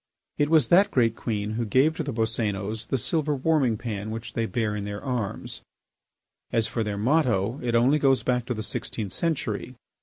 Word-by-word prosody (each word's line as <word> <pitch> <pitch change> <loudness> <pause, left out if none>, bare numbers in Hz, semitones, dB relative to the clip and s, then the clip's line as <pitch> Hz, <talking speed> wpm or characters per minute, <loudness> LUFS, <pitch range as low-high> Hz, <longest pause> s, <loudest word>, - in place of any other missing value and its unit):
It 145 0 +2
was 155 -7 +4
that 195 +4 +6
great 115 -3 +2
queen 105 -3 -2
who 115 +2 -1
gave 135 +8 +3
to - - -2
the 140 - -3
Boscénos 110 -2 -2
the 135 - 0
silver 150 +4 0
warming 135 -5 +2
pan 105 -2 -4
which 115 +2 -6
they 115 -1 -1
bear 110 -4 -1
in 105 - -3
their 100 0 -4
arms. 125 -7 -3 0.9
As 115 -1 +2
for 115 - -2
their 105 -1 -3
motto, 120 -2 +1
it 120 -1 0
only 130 +6 +4
goes 135 -2 +3
back 125 -1 0
to 125 - -1
the 110 - -3
sixteenth 105 -1 -4
century. 130 -7 -2
115 Hz, 190 wpm, -26 LUFS, 110-135 Hz, 0.9 s, that